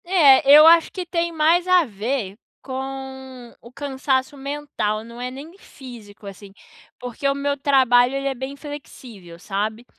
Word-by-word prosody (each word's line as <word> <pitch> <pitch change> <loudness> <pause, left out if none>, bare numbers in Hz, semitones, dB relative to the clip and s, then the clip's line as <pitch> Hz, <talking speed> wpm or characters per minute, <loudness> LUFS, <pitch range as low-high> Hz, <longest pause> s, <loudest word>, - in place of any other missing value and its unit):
É, 315 -8 +5
eu 300 +2 +9
acho 335 0 +5
que 365 -2 -6
tem 340 0 -2
mais 330 +3 +1
a 365 -2 +4
ver 215 -2 -4 0.3
com 265 -2 -8
o 235 - -15
cansaço 265 0 -2
mental, 275 -7 -4
não 235 +1 -11
é 250 - -4
nem 285 +7 -11
físico, 230 - -14
assim. 195 0 -11 0.5
Porque 250 +2 -5
o 275 - 0
meu 280 0 -2
trabalho, 260 -2 +3
ele 275 0 -3
é 275 - -1
bem 265 +2 -7
flexível, 250 - -11
sabe. 215 +5 -4
265 Hz, 155 wpm, -21 LUFS, 235-290 Hz, 0.5 s, eu